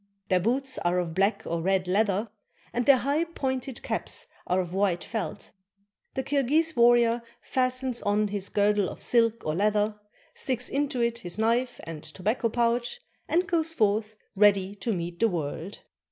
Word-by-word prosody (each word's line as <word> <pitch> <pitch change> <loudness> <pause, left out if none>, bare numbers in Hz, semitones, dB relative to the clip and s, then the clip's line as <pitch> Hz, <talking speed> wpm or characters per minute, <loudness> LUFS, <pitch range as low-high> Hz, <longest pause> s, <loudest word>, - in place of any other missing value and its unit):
Their 185 - +4
boots 260 +7 0
are 175 +1 +1
of 175 -2 -1
black 195 +5 +1
or 170 0 -2
red 190 +1 +1
leather, 205 +2 +1 0.4
and 245 0 -1
their 275 -2 +8
high, 280 +6 +1
pointed 265 -6 -4
caps - - -2 0.2
are 180 - +2
of 180 -1 -3
white 190 -3 +1
felt. 210 -9 -5 0.6
The 265 - -1
Kirghis 290 +4 +1
war 240 0 +6
rior 235 0 +2 0.2
fastens 255 -1 0
on 205 +1 +1
his 200 -1 -3
girdle 205 -1 +2
of - - -9
silk 230 -1 +2
or 155 - 0
leather, 210 +3 +1 0.3
sticks 255 -2 -2
into 280 -2 -1
it 235 0 0
his 175 -5 -3
knife 235 +3 +1
and 165 -2 -7
tobacco 210 +9 -1
pouch, 240 - 0 0.3
and 350 +3 +2
goes 325 -2 0
forth 215 -1 +1 0.2
ready 200 -1 +4
to 225 +3 -3
meet 170 -3 -4
the 230 - +4
world. 165 +2 -4
220 Hz, 170 wpm, -27 LUFS, 195-255 Hz, 0.6 s, their